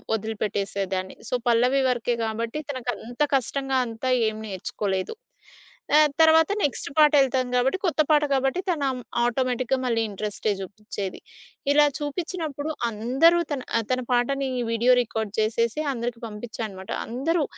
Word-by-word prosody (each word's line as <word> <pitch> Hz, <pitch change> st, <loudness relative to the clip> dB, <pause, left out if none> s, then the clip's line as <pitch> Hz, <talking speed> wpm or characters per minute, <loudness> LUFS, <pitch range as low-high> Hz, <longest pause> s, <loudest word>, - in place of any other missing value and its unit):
ఒదిలిపెట్టేసేదాన్ని. 200 Hz, -3 st, -3 dB
So, -, -, -5 dB, 0.2 s
పల్లవి 250 Hz, +4 st, +3 dB
వరకే 240 Hz, -1 st, 0 dB
కాబట్టి 230 Hz, +6 st, -3 dB
తనకంత 245 Hz, -1 st, -5 dB
కష్టంగా 270 Hz, +1 st, 0 dB
అంతా 230 Hz, +3 st, -3 dB, 0.2 s
ఏం 215 Hz, -, -7 dB
నేర్చుకోలేదు. 190 Hz, -, -3 dB, 0.8 s
ఆహ్, 305 Hz, -1 st, +6 dB
తర్వాత 320 Hz, +1 st, +6 dB
నెక్స్ట్ 285 Hz, -, -1 dB
పాటెళ్తాం 270 Hz, -4 st, +4 dB
కాబట్టి 260 Hz, +8 st, +2 dB
కొత్త 320 Hz, -2 st, +2 dB
పాట 300 Hz, -1 st, +5 dB
కాబట్టి 270 Hz, +6 st, +1 dB
తనం 280 Hz, -6 st, 0 dB, 0.3 s
ఆటోమేటిక్‌గా 255 Hz, +1 st, 0 dB
మళ్ళీ 230 Hz, -2 st, +1 dB
ఇంట్రెస్టే 210 Hz, +1 st, -2 dB
చూపించేది. 200 Hz, 0 st, -6 dB, 0.5 s
ఇలా 295 Hz, +1 st, +6 dB
చూపించినప్పుడు 310 Hz, -1 st, -4 dB, 0.2 s
అందరూ 260 Hz, +11 st, +3 dB
తన 270 Hz, -3 st, -1 dB, 0.2 s
ఆహ్, 225 Hz, -, -1 dB
తన 255 Hz, 0 st, +1 dB
పాటని 265 Hz, +2 st, +1 dB, 0.2 s
వీడియో 235 Hz, +2 st, +3 dB
రికార్డ్ 220 Hz, -3 st, -3 dB
చేసేసి 230 Hz, +4 st, +1 dB
అందరికి 235 Hz, 0 st, -4 dB
పంపించా 220 Hz, +2 st, -7 dB
అనమాట! 190 Hz, -1 st, -9 dB, 0.2 s
అందరూ 295 Hz, +7 st, 0 dB
245 Hz, 125 wpm, -25 LUFS, 220-275 Hz, 0.8 s, ఆహ్